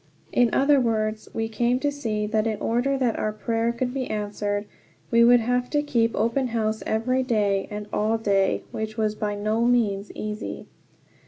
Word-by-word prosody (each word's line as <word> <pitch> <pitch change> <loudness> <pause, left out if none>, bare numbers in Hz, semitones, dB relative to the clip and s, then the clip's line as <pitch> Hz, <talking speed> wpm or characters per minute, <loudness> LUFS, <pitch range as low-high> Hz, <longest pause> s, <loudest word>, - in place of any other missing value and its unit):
In 245 -2 +3
other 280 +1 +4
words, 215 -3 -1
we 225 0 -2
came 235 +3 +1
to 290 - +1
see 220 -7 -2
that 215 +1 0
in 215 -2 -2
order 250 +4 0
that 250 -4 0
our 215 - 0
prayer 225 +2 -1
could 245 +1 -3
be 265 -2 -3
answered 205 -1 -2 0.5
we 235 0 +6
would 240 0 +6
have 245 +2 0
to 295 -1 +1
keep 230 -5 +1
open 235 +4 +1
house 220 -2 -1
every 255 +4 +1
day 210 -6 +1
and 210 0 -5
all 215 +2 +1
day, 200 -3 +1
which 220 0 -4
was 215 -1 +1
by 210 -1 -3
no 215 +3 0
means 215 -5 +1
easy. 210 +1 -5
225 Hz, 180 wpm, -25 LUFS, 215-245 Hz, 0.5 s, we